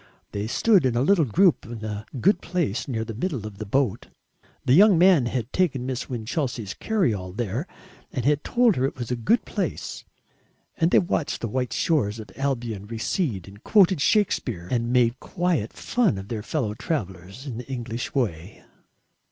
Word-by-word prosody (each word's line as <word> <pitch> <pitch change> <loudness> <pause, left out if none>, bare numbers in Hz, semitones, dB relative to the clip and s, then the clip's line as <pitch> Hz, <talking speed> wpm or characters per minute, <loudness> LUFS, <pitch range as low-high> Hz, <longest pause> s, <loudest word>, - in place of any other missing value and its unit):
They 105 +1 -3
stood 195 - +4
in 125 -2 +1
a 120 - +2
little 175 0 +4
group 175 - +3
in 115 -2 -7
a 105 0 -5
good 185 - +3
place 165 - -2
near 115 -4 -2
the 115 - -6
middle 130 - -3
of 105 -2 -8
the 110 - -5
boat 130 -1 0 0.6
the 125 - +4
young 195 +3 +7
man 175 -7 +5
had 120 -1 -3
taken 145 -9 +1
Miss 130 -1 -4
Winchelsea's 120 - -3
carry 205 - +1
all 90 -2 -5
there 120 - -3 0.4
and 125 -3 -3
had 145 0 +2
told 240 -4 +3
her 130 - +2
it 135 - -2
was 120 -1 -5
a - - +1
good 120 - +1
place - - -4 0.7
and 165 -2 +2
they - - +5
watched 170 -4 0
the 115 - -1
white 125 +2 -2
shores 120 -11 +1
of 110 - -9
Albion 120 -7 -2
recede 110 - -2
and 100 +2 -14
quoted 190 -6 +4
Shakespeare 125 - +1
and 120 -1 0
made 125 -1 +3
quiet 175 - -1
fun 240 - 0
of 95 +1 -8
their 110 -3 -3
fellow 115 -3 -2
travellers 100 - -5
in 120 -5 -5
the 125 - -8
English 120 -2 -4
way. 100 -8 -2
125 Hz, 185 wpm, -25 LUFS, 110-160 Hz, 0.7 s, young